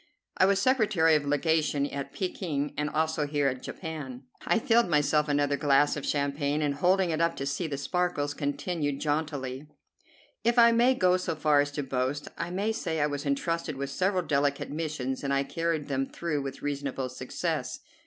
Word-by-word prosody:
I 185 Hz, -, +4 dB
was 195 Hz, 0 st, +3 dB
secretary 205 Hz, -9 st, +3 dB
of 150 Hz, -2 st, +2 dB
legation 145 Hz, 0 st, +1 dB
at 140 Hz, 0 st, -5 dB
Pekin 155 Hz, -6 st, -3 dB
and 150 Hz, +1 st, -1 dB
also 155 Hz, -1 st, 0 dB
here 145 Hz, -1 st, +1 dB
in 130 Hz, -1 st, -5 dB
Japan." 145 Hz, -7 st, -7 dB, 0.2 s
I -, -, +4 dB
filled 230 Hz, -2 st, +3 dB
myself 150 Hz, 0 st, +2 dB
another 145 Hz, 0 st, +1 dB
glass 145 Hz, 0 st, +3 dB
of 150 Hz, -, -5 dB
champagne, 145 Hz, +1 st, 0 dB
and, 145 Hz, -1 st, +1 dB
holding 180 Hz, +4 st, +2 dB
it 160 Hz, +1 st, -1 dB
up 170 Hz, 0 st, +2 dB
to 135 Hz, -, -4 dB
see 140 Hz, +5 st, -2 dB
the 140 Hz, -3 st, -3 dB
sparkles, 145 Hz, 0 st, -1 dB
continued 145 Hz, 0 st, -2 dB
jauntily: 145 Hz, -3 st, -2 dB, 0.8 s
"If 235 Hz, +1 st, +2 dB
I 235 Hz, 0 st, +8 dB
may 240 Hz, +3 st, +4 dB
go 185 Hz, -5 st, +3 dB
so 180 Hz, -3 st, -3 dB
far 150 Hz, -2 st, +3 dB
as 145 Hz, -, -1 dB
to 145 Hz, -, -2 dB
boast, 130 Hz, +2 st, -2 dB
I 170 Hz, +2 st, -4 dB
may 200 Hz, +5 st, -1 dB
say 165 Hz, -7 st, -2 dB
I 145 Hz, -, +3 dB
was 145 Hz, -1 st, -3 dB
entrusted 155 Hz, +2 st, -1 dB
with 140 Hz, 0 st, -4 dB
several 185 Hz, +3 st, +1 dB
delicate 140 Hz, -2 st, 0 dB
missions, 145 Hz, -4 st, -3 dB
and 140 Hz, -, -1 dB
I 140 Hz, 0 st, +2 dB
carried 165 Hz, 0 st, -2 dB
them 135 Hz, -1 st, -1 dB
through 155 Hz, -4 st, -3 dB
with 135 Hz, 0 st, -6 dB
reasonable 140 Hz, -2 st, -2 dB
success. 125 Hz, 0 st, -3 dB
150 Hz, 185 wpm, -28 LUFS, 140-170 Hz, 0.8 s, I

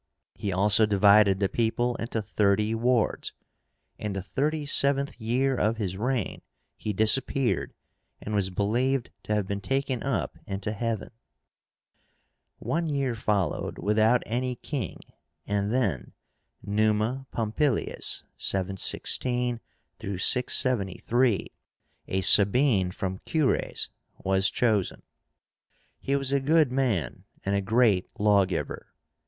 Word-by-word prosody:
He 100 Hz, -, -4 dB
also 105 Hz, +4 st, +4 dB
divided 100 Hz, -1 st, +5 dB
the 100 Hz, -, +2 dB
people 120 Hz, +3 st, 0 dB
into 115 Hz, -1 st, -3 dB
thirty 105 Hz, +2 st, +1 dB
wards. 120 Hz, 0 st, 0 dB, 0.7 s
In 105 Hz, -1 st, -3 dB
the 95 Hz, -1 st, -4 dB
thirty 150 Hz, +7 st, -1 dB
seventh 140 Hz, -2 st, +2 dB
year 130 Hz, +4 st, +1 dB
of 110 Hz, -1 st, 0 dB
his 95 Hz, -4 st, -3 dB
reign 120 Hz, +2 st, -2 dB, 0.3 s
he 105 Hz, -, -4 dB
disappeared, 120 Hz, +5 st, +1 dB, 0.4 s
and 105 Hz, -, -6 dB
was 100 Hz, -2 st, +1 dB
believed 120 Hz, +7 st, 0 dB
to 105 Hz, -, -2 dB
have 105 Hz, -2 st, 0 dB
been 100 Hz, +1 st, -4 dB
taken 135 Hz, 0 st, -1 dB
up 115 Hz, -, -2 dB
into 100 Hz, +2 st, -3 dB
heaven. 115 Hz, +1 st, -3 dB, 1.5 s
One 165 Hz, 0 st, -2 dB
year 140 Hz, -4 st, -1 dB
followed 105 Hz, -4 st, -1 dB
without 110 Hz, +4 st, +2 dB
any 125 Hz, +2 st, -2 dB
king, 125 Hz, -, -5 dB, 0.4 s
and 100 Hz, 0 st, -1 dB
then 95 Hz, -, -1 dB, 0.5 s
NUMA 110 Hz, +5 st, 0 dB
POMPILIUS(716 105 Hz, -5 st, -2 dB
673), 120 Hz, -1 st, -1 dB, 0.6 s
a 95 Hz, -, -1 dB
Sabine 100 Hz, 0 st, +4 dB
from 95 Hz, +1 st, -4 dB
Cures, 155 Hz, -5 st, 0 dB, 0.3 s
was 95 Hz, +1 st, +2 dB
chosen. 110 Hz, -6 st, 0 dB, 1.0 s
He 140 Hz, -, -1 dB
was 135 Hz, -1 st, 0 dB
a 140 Hz, -, +3 dB
good 150 Hz, 0 st, +3 dB
man, 120 Hz, -, -1 dB, 0.2 s
and 100 Hz, +1 st, +1 dB
a 100 Hz, -, +1 dB
great 110 Hz, -2 st, +2 dB
lawgiver. 100 Hz, -3 st, +1 dB
110 Hz, 110 wpm, -27 LUFS, 100-130 Hz, 1.5 s, divided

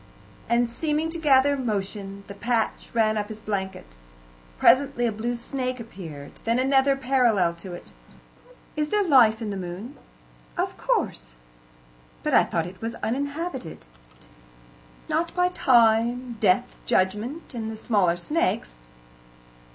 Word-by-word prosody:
And, 235 Hz, +1 st, +3 dB
seeming 305 Hz, +6 st, -1 dB
to 335 Hz, -, -4 dB
gather 285 Hz, -2 st, +4 dB
motion, 200 Hz, -5 st, -4 dB
the 200 Hz, -, -9 dB
patch 230 Hz, +2 st, -1 dB
ran 220 Hz, -2 st, +2 dB
up 205 Hz, +1 st, -4 dB
his 215 Hz, -1 st, -7 dB
blanket. 190 Hz, -, -4 dB, 0.6 s
Presently 265 Hz, -, +4 dB
a 235 Hz, -, +1 dB
blue 230 Hz, +3 st, -2 dB
snake 255 Hz, +1 st, -4 dB
appeared; 165 Hz, -11 st, -9 dB
then 230 Hz, +1 st, +1 dB
another, 270 Hz, +1 st, +3 dB
parallel 245 Hz, -10 st, +2 dB
to 180 Hz, +1 st, -9 dB
it. 175 Hz, -, -10 dB, 0.8 s
"Is 300 Hz, -1 st, -1 dB
there 415 Hz, +3 st, +2 dB
life 240 Hz, -, +5 dB
in 210 Hz, -, -3 dB
the 200 Hz, -, -4 dB
moon?" 190 Hz, +9 st, -7 dB, 0.6 s
"Of -, -, -1 dB
course." -, -, -2 dB, 0.9 s
"But -, -, -1 dB
I -, -, +7 dB
thought 165 Hz, -1 st, -1 dB
it 185 Hz, +2 st, -10 dB
was 225 Hz, +1 st, -3 dB
uninhabited." 280 Hz, -, -3 dB, 1.2 s
"Not 335 Hz, +1 st, -1 dB
by 360 Hz, 0 st, +3 dB
Time, 240 Hz, -4 st, +3 dB
Death, 205 Hz, +4 st, +2 dB
Judgment, 215 Hz, -, 0 dB
and 225 Hz, -2 st, -4 dB
the 220 Hz, -, -6 dB
smaller 200 Hz, -7 st, +2 dB
snakes." 175 Hz, -, -1 dB
230 Hz, 135 wpm, -25 LUFS, 200-270 Hz, 1.2 s, I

